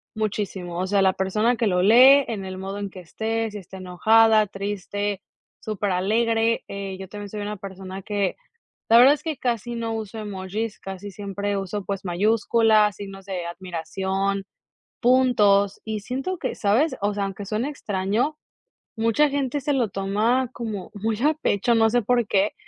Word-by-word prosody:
muchísimo, 195 -5 -3
o 185 - -1
sea, 200 0 +2
la 190 -1 +4
persona 215 +6 +1
que 230 - 0
lo 180 -2 +2
lee, 260 +7 +7
en 200 -4 -4
el 185 0 -6
modo 195 +2 -5
en 200 -1 -4
que 185 - -11
esté, 225 +5 -3
si 205 - -6
está 190 +1 -11
enojada, 215 +4 +4
triste, 205 0 -3 0.4
superalegre, 220 +3 0
eh, 195 -1 -5
yo 190 - -7
también 205 +1 -8
soy 210 0 -6
una 210 +1 -4
persona 190 0 -8
que 205 -1 -2 0.5
la 230 - +7
verdad 255 +4 +8
es 295 - -5
que 315 -3 -3
casi 240 -1 -2
no 230 -1 -3
uso 220 0 -5
emojis, 205 +1 -4
casi 195 +1 -7
siempre 200 +1 -3
uso, 195 +1 -4
pues, 200 0 -4
mayúsculas, 215 +2 +3
signos 195 -1 -9
de 185 -3 -4
admiración, 190 +3 -3 0.6
puntos, 220 -6 +3
y 220 -1 -3
siento 265 - -3
que, - - -3
¿sabes?, 225 +10 +2
o 205 +1 +1
sea, 200 -1 -1
aunque 195 +1 -6
suene 215 +6 -2
extraño, 220 +3 -1 0.6
mucha 230 +7 +3
gente 280 0 -1
se 290 - -1
lo 245 -5 +1
toma 215 +7 0
como 215 -5 -5
muy 215 +1 -2
a 305 +1 +4
pecho, 235 -5 +1
no 225 0 +4
sé 240 +1 +2
por 240 0 +1
qué, 200 +1 +2
205 Hz, 170 wpm, -24 LUFS, 195-230 Hz, 0.6 s, verdad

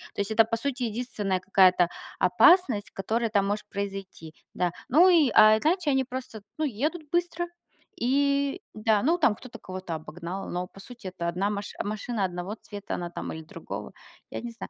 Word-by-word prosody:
То - - 0
есть, 200 +2 -3
это, 225 +1 +5
по 230 +1 -1
сути, 255 +2 -3
единственная 210 -5 -2
какая-то 185 -2 +4 0.3
опасность, 335 - +4
которая 225 +4 -1
там 200 -2 +2
может 205 +1 -2
произойти. 195 -5 -6 0.2
Да. 180 -1 0 0.2
Ну 325 +8 +6
и, 325 -7 +5
а 215 0 +8
иначе 330 - +1
они 265 -1 +2
просто, 255 -4 -7 0.2
ну, 310 - -1
едут 300 +5 -2
быстро. 345 0 0 0.6
И 280 +5 +1
да. 215 -1 +2
Ну 330 +5 +3
там 265 -11 +3
кто-то 240 -1 -11
кого-то 185 -3 -6
обогнал, 170 +5 -6
но, 180 +1 -3
по 195 - -16
сути, 240 0 -10
это 175 -2 -4
одна 185 +4 0
маш 205 0 -4
машина 215 +1 -3
одного 180 +2 -3
цвета, 205 -2 -7
она 175 -1 -4
там 175 - -5
или 160 - -7
другого. 155 - -7 0.4
Я - - -4
не 240 - -6
знаю. 230 - -9
215 Hz, 185 wpm, -27 LUFS, 190-265 Hz, 0.6 s, а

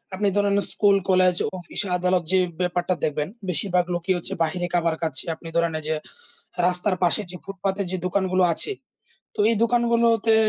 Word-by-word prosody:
আপনি 205 +1 0
ধরেন 205 -1 +2 0.2
school, 200 -1 +3
college 185 -1 +4 0.2
office 175 +3 -5 0.2
আদালত 180 0 +1
যে, 190 - +4 0.2
ব্যাপারটা 180 0 0
দেখবেন। 150 0 -1 0.2
বেশিরভাগ 180 +1 +1
লোকই 175 +2 0
হচ্ছে 175 - -2
বাইরে 175 +2 -2
খাবার 170 -2 +1
কাচ্ছে। 155 -5 0
আপনি 165 - -12
ধরেন 170 -1 +1
এই - - -11
যে, 155 - 0 0.7
রাস্তার 180 +2 +2
পাশে 175 - +2
যে, - - -8
ফুটপাতে 195 0 -3
যে, 185 - -1
দোকানগুলো 185 0 +1
আছে, 420 - -1 0.6
তো - - -3
এই 230 - +1
দোকানগুলোতে 235 -2 +3
185 Hz, 165 wpm, -23 LUFS, 175-200 Hz, 0.7 s, college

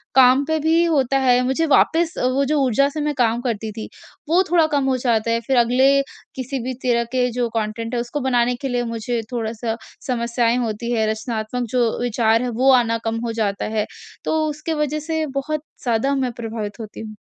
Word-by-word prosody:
काम 260 +1 +6
पे 315 +1 0
भी 320 +2 +3
होता 275 -5 +2
है, 250 -2 +4
मुझे 265 +6 +1
वापस 330 +1 +3 0.2
वो 275 +1 +2
जो 300 +2 +1
ऊर्जा 265 +2 +3
से 300 +1 -4
मैं 300 0 0
काम 235 -2 +1
करती 225 -3 -3
थी 220 +1 -7 0.4
वो 345 +3 +5
थोड़ा 340 -2 +5
कम 285 -3 0
हो 260 - +1
जाता 230 -2 +1
है। 230 - +2
फिर 265 - +2
अगले 260 +4 +4 0.3
किसी 260 +1 -4
भी 255 +1 -3
तरह 240 -2 +2
के 250 -1 +1
जो 240 0 -1
कॉन्टेंट 225 +1 -3
है - - 0
उसको 240 +5 -4
बनाने 245 -1 +2
के 275 - -2
लिए 245 -1 -1
मुझे 230 +1 -2
थोड़ा 230 -3 -2
सा 225 0 -3 0.3
समस्याएँ 235 -1 +1
होती 230 +1 -3
हैं, 220 -2 +1
रचनात्मक 220 +2 -3
जो 245 -2 +3
विचार 230 -1 +2
हैं 250 - -1
वो 270 - +7
आना 230 -1 -1
कम 225 0 -1
हो 230 - -2
जाता 200 -2 -1
है। 210 - +1 0.4
तो 315 - +1
उसके 305 +2 -4
वजह 300 +1 -2
से 320 -1 0
बहुत 305 +2 -3 0.2
ज़्यादा 245 +3 +1
मैं 260 -2 0
प्रभावित 220 -1 -5
होती 215 -2 -8
हूँ। 215 -1 -8
245 Hz, 210 wpm, -21 LUFS, 230-275 Hz, 0.4 s, वो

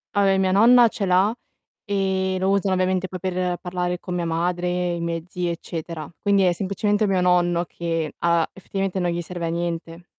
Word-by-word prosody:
Vabbè 195 -1 +3
mia 190 -1 +2
nonna 235 +4 +6
ce 200 -2 -3
l'ha, 185 +4 +3 0.5
ehm, 190 -2 0
lo 190 +1 +1
usa 200 0 +1
ovviamente 185 0 +1
poi 185 0 -7
per 180 -1 -1
parlare 180 0 -3
con 180 0 -5
mia 175 -1 -1
madre, 175 +1 -1
i - - -5
miei 170 -1 -3
zii 180 -1 -2
eccetera. 165 -1 -6
Quindi 200 -1 +2
è 180 - +4
semplicemente 205 +3 0
mio 190 -2 +1
nonno 175 -1 +2
che 165 -3 -3
ha 170 -1 +2
effettivamente 195 0 -4
non 175 -1 0
gli 170 0 -2
serve 175 0 -5
a - - -1
niente. 170 0 -4
180 Hz, 190 wpm, -23 LUFS, 170-190 Hz, 0.5 s, nonna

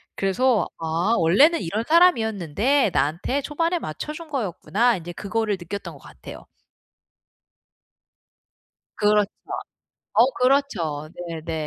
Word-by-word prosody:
그래서 210 +1 +1
'아 165 +7 0
원래는 270 - +4
이런 205 +6 -2
사람이었는데 235 - +3
나한테 165 - 0
초반에 330 +5 -1
맞춰 225 - -6
준 325 +1 -10
거였구나.' 235 - 0
인제 175 0 -8
그거를 210 +3 -2
느꼈던 190 +4 -7
것 - - -19
같아요. - - -12 2.5
그렇죠. 210 -1 +3 0.8
어 235 - +6
그렇죠. 215 - +1 0.2
네네. 165 0 -6
210 Hz, 250 characters per minute, -23 LUFS, 170-275 Hz, 2.5 s, 어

